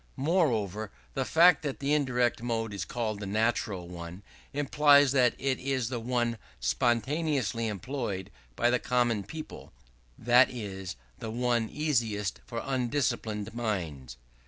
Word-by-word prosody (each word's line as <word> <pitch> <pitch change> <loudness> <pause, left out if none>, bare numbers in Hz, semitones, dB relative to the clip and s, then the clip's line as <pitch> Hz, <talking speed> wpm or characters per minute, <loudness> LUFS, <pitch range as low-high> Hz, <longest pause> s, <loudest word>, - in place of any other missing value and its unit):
Moreover, 115 - +1 0.2
the 135 - -1
fact 170 +2 +6
that 140 -3 -4
the 140 +1 0
indirect 125 -5 +1
mode 115 -2 -2
is 100 - -3
called 110 -4 -3
the 105 - -5
natural 105 -3 0
one, 85 +2 -8 0.3
implies 145 0 +5
that 125 -3 +3
it 135 -1 -1
is 130 -3 -1
the 125 -2 -3
one 120 -1 -1 0.2
spontaneously 120 - 0
employed 105 -2 -4 0.2
by 120 - +2
the 125 - +2
common 120 -4 +1
people: 155 +8 -9 0.5
that 120 +3 +5
is 95 - -6 0.2
the 110 - -5
one 120 -1 0
easiest 115 -10 -1
for 115 -1 -4
undisciplined 120 -5 -1
minds. 85 - -3
120 Hz, 135 wpm, -29 LUFS, 105-135 Hz, 0.5 s, fact